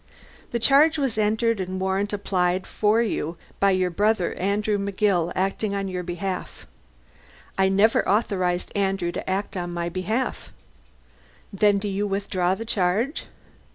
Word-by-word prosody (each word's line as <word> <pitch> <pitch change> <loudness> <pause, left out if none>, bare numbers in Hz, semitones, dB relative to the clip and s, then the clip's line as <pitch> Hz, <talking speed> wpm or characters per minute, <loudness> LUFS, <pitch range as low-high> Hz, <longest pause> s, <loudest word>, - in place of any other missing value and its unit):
"The 235 - 0
charge 285 +7 +5
was 265 -7 -1
entered 220 +1 +1
and 185 0 -3
warrant 190 +2 -1
applied 185 -2 0
for 215 +2 +2 0.6
by 200 - +4
your 185 -1 +2
brother, 205 0 +1
Andrew 205 +2 0
McGill, 195 -3 +1
acting 195 +2 -1
on 195 -1 -2
your 185 -1 -3
behalf." 180 +1 -5 0.9
"I 190 0 +3
never 200 +4 +3
authorized 185 -4 0
Andrew 195 -3 0
to - - -5
act 195 +2 -2
on 175 -1 -3
my 170 0 -2
behalf." 215 +8 -3 1.0
"Then 205 +1 +3
do 200 +1 -3
you 200 +1 -1
withdraw 195 -2 0
the 225 - -6
charge?" 215 - 0
195 Hz, 140 wpm, -24 LUFS, 185-210 Hz, 1.0 s, charge